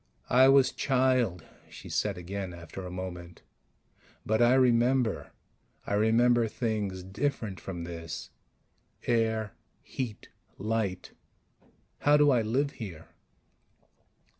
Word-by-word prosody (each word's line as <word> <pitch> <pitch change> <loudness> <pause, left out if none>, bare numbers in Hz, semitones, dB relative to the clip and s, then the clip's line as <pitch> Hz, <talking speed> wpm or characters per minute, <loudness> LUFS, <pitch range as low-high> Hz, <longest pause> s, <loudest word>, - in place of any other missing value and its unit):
"I 130 +2 +7
was 135 -1 +5
child," 130 - +1 0.3
she - - -11
said - - -1
again 95 0 -5
after 85 +3 -9
a 90 - -6
moment. 90 -1 -7 0.8
"But 110 +2 +1
I 120 +2 +5
remember 125 -2 +2 0.6
I - - -3
remember 115 +3 +3
things 105 -5 -3
different 105 0 -3
from 85 -3 -6
this. 85 -1 -7 0.7
Air... 110 -3 0 0.3
heat... 120 -6 -6 0.3
light... 105 -3 -2 0.9
how 145 0 +5
do 145 -1 +5
I 125 -3 +3
live 130 +6 0
here?" 95 - -9
110 Hz, 110 wpm, -29 LUFS, 95-125 Hz, 0.9 s, I